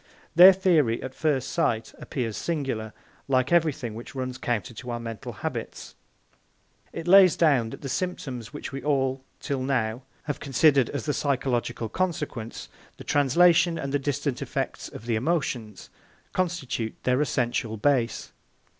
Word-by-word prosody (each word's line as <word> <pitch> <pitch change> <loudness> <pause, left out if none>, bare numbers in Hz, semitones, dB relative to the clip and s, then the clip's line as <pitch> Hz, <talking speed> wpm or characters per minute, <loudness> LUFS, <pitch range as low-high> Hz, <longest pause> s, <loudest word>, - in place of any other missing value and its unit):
Their 180 +3 +10
theory, 165 -11 +2
at 130 - -6
first 140 -4 0
sight, 120 -10 0
appears 115 -6 -3
singular, 135 -10 -3 0.4
like 130 0 +1
everything 155 -9 +1
which 115 +5 -9
runs 130 0 -4
counter 120 -1 -2
to 125 +2 -9
our 120 0 -3
mental 115 -2 -6
habits. - - -6 1.0
It 165 - -6
lays 185 -2 +7
down 140 -9 +3
that - - -9
the - - -3
symptoms 135 -8 -4
which 145 - -7
we 135 0 -5
all 135 -2 0 0.2
till 140 -2 -3
now 125 -3 -1 0.2
have 145 - -4
considered 140 -2 +3
as 145 - -4
the 145 - 0
physiological 120 -5 -1
consequence, 150 - -3 0.3
the - - -10
translation, 165 +4 +4
and 140 0 -4
the 145 - +2
distant 140 -1 -2
effects - - -3
of 115 - -10
the 120 -1 0
emotions, 125 - -2 0.4
constitute 160 -11 -2
their 125 +2 +2
essential 120 -5 -1
base. 120 0 0
135 Hz, 145 wpm, -26 LUFS, 120-150 Hz, 1.0 s, Their